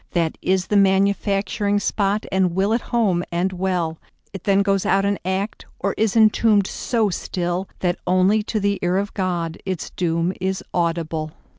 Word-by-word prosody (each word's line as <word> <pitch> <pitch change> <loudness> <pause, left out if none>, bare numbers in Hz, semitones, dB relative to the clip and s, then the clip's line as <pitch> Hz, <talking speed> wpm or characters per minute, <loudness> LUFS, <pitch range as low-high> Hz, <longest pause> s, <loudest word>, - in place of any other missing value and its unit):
That 165 -2 0
is 185 -1 +1
the 210 - +1
manufacturing 200 +1 +2
spot, 205 +1 0
And 185 -2 +1
will 195 +3 +2
at 230 - +1
home 200 -7 +1
and 180 +2 0
well.It 180 0 -4
then 200 0 +3
goes 195 -1 +1
out 195 +1 +2
an 200 0 0
act, 190 +3 -3
Or 200 +1 -1
is 220 -1 0
entombed 215 -2 +4
so 225 +1 0
stillThat 175 0 -2
only 185 +4 +3
to 215 +1 -2
the 200 0 0
ear 180 +1 +1
of 200 +1 -2
GodIts 180 -1 -3
doom 170 0 0
is 190 +1 -1
audible. 165 -2 -1
190 Hz, 155 wpm, -22 LUFS, 175-200 Hz, -, entombed